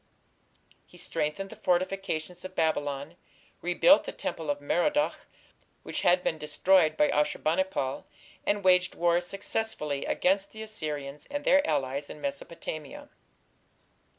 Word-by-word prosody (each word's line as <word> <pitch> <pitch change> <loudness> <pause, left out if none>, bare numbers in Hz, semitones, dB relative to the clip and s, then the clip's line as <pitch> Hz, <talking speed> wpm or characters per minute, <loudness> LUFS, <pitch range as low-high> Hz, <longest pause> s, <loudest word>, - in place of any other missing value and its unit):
He - - -16
strengthened 170 +6 -2
the - - -9
fortifications 180 -2 -1
of 185 0 -8
Babylon, 145 0 -1 0.4
rebuilt 180 - +5
the - - -4
temple 160 -2 -4
of 145 0 0
Merodach, 285 - 0 0.6
which - - -3
had 180 +1 +4
been 160 - -1
destroyed 155 +2 +3
by 150 - +4
Ashur 150 0 +1
bani 165 +4 +2
pal, 135 -8 -3 0.4
and 205 -1 0
waged 180 -1 +4
war 175 0 +3
successfully 180 -6 -2
against 195 +2 +1
the 220 0 -7
Assyrians 150 -9 -5
and 290 0 -3
their 285 0 +5
allies 140 -1 -1
in - - -9
Mesopotamia. 280 - -6
175 Hz, 130 wpm, -29 LUFS, 150-195 Hz, 0.6 s, rebuilt